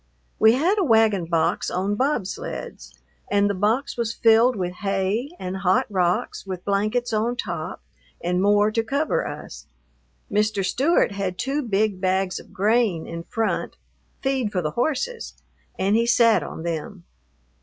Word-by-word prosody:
We 220 +1 +6
had 350 - +2
a - - +3
wagon 220 - +3
box 165 -1 0
on 190 +3 -1
bobsleds, 265 - -3 0.3
and 205 0 +3
the 200 - 0
box 220 +9 0
was 230 -1 -2
filled 230 +2 +4
with 180 -3 -3
hay 200 +6 -1
and 185 +1 -4
hot 190 -1 +2
rocks 180 -2 0
with 185 -2 -7
blankets 215 +5 0
on 225 +3 0
top - - -5 0.4
and 180 +1 0
more 205 +1 +4
to 225 - +1
cover 280 +7 -1
us. - - -9 0.6
Mr. 210 -1 +1
Stewart 285 - +2
had 195 -2 -3
two 275 +7 -1
big 210 -5 0
bags 190 0 0
of - - -15
grain 205 -4 +1
in 170 0 -7
front, 225 -1 -2 0.5
feed 265 -5 0
for 180 -3 -1
the 155 - -1
horses, 315 - -2 0.4
and 195 +2 +2
he 230 +1 +2
sat 235 -1 +4
on 160 - -7
them. 170 +2 -4
210 Hz, 155 wpm, -23 LUFS, 190-240 Hz, 0.6 s, We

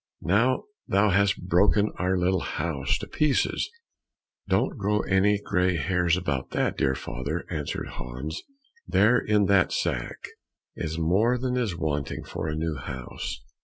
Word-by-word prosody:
Now 115 +8 +2 0.2
thou 100 +1 +3
hast 100 -1 +2
broken 100 +4 +3
our 95 +1 +1
little 90 +1 +2
house 70 -6 -1
to - - -7
pieces!" 150 -3 +1 0.8
"Don't - - +1
grow 105 -2 +1
any 100 +2 +3
grey 90 -3 +1
hairs 90 +2 +2
about 70 -7 -2
that, - - +1
dear 65 -1 +1
father," 70 +5 -4
answered 75 -3 -3
Hans; 65 +6 -6 0.5
"there, 110 +5 +4
in 105 -1 +2
that 95 -2 +4
sack, - - -2 0.5
is 80 +1 -3
more 100 +10 +2
than 125 0 -1
is 115 -8 0
wanting 75 -4 -2
for - - -5
a 75 - -2
new 80 -1 -2
house." 65 -1 -6
90 Hz, 145 wpm, -26 LUFS, 75-105 Hz, 0.8 s, there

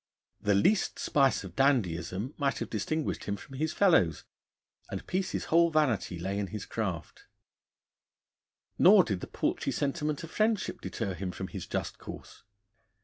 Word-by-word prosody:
The 105 -1 +2
least 190 - +2
spice 135 -6 +2
of 95 -2 -9
dandyism 110 - +1
might 140 -1 +1
have - - -5
distinguished 150 +8 -2
him 100 - -1
from 135 +5 -11
his 155 +2 0
fellows, 160 - +3 0.7
and - - -5
Peace's 185 +1 -2
whole 170 0 +6
vanity 140 - +1
lay 95 +4 -2
in 100 - -2
his 105 0 -6
craft. 95 -8 -4 1.5
Nor 195 +1 +8
did 100 - -2
the - - -7
paltry - - -1
sentiment 150 +1 -1
of 165 - -8
friendship 215 -1 0
deter 100 -5 -3
him 95 +1 -4
from 95 +1 -6
his 95 -4 -6
just - - -3
course. - - -10
120 Hz, 150 wpm, -30 LUFS, 95-155 Hz, 1.5 s, Nor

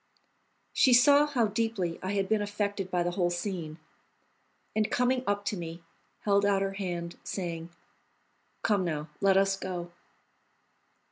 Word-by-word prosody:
She 255 - +5
saw 285 +4 +6
how 255 -6 +2
deeply 210 -5 -1
I 190 +2 -2
had 195 -1 0
been 215 +1 +2
affected 205 -2 -2
by 180 -1 +1
the 175 - -1
whole 175 -1 +1
scene, 175 -3 -4 1.0
and, 215 -1 +1
coming 250 +1 +1
up 205 0 0
to 210 - -1
me, 170 0 -7 0.4
held 200 -1 +3
out 200 -1 +3
her 195 0 -2
hand, 175 -3 -4
saying: 170 -3 -4 0.9
"Come 205 -3 +2
now, 155 -3 -3
let 195 -1 +5
us 195 0 +3
go." 180 -2 -5
195 Hz, 145 wpm, -29 LUFS, 175-210 Hz, 1.0 s, saw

